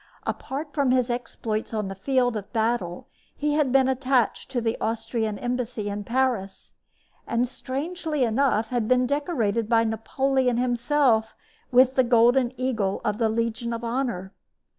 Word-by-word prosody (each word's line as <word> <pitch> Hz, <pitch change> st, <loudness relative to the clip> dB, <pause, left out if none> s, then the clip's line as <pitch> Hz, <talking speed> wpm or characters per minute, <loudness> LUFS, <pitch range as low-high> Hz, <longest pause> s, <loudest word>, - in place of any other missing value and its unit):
Apart 290 Hz, +2 st, -4 dB
from 280 Hz, -3 st, +1 dB
his 250 Hz, -1 st, +2 dB
exploits 225 Hz, -2 st, -3 dB
on 210 Hz, -2 st, -1 dB
the 195 Hz, -, -5 dB
field 245 Hz, +4 st, +1 dB
of 205 Hz, -2 st, -6 dB
battle 220 Hz, -6 st, -1 dB, 0.3 s
he 295 Hz, 0 st, -1 dB
had 295 Hz, -4 st, +2 dB
been 265 Hz, 0 st, +4 dB
attached 260 Hz, -3 st, +1 dB
to 260 Hz, -2 st, -1 dB
the 225 Hz, -1 st, -1 dB
Austrian 225 Hz, -1 st, -2 dB
embassy 245 Hz, -3 st, -3 dB
in 205 Hz, 0 st, -4 dB
Paris, 235 Hz, -5 st, -1 dB, 0.5 s
and, 235 Hz, +1 st, +1 dB
strangely 300 Hz, +4 st, -3 dB
enough, 230 Hz, -2 st, +1 dB
had 240 Hz, -3 st, -1 dB
been 255 Hz, +1 st, +3 dB
decorated 245 Hz, -, -1 dB
by 230 Hz, -1 st, +4 dB
Napoleon 250 Hz, +3 st, 0 dB
himself 245 Hz, -1 st, +2 dB, 0.4 s
with, 255 Hz, +1 st, +5 dB
the 260 Hz, -, +4 dB
golden 240 Hz, +1 st, +4 dB
eagle 225 Hz, -7 st, -1 dB
of 210 Hz, 0 st, -1 dB
the 225 Hz, -2 st, +2 dB
Legion 230 Hz, +1 st, -1 dB
of 230 Hz, 0 st, -5 dB
Honor. 230 Hz, -6 st, -2 dB
240 Hz, 150 wpm, -25 LUFS, 220-260 Hz, 0.5 s, with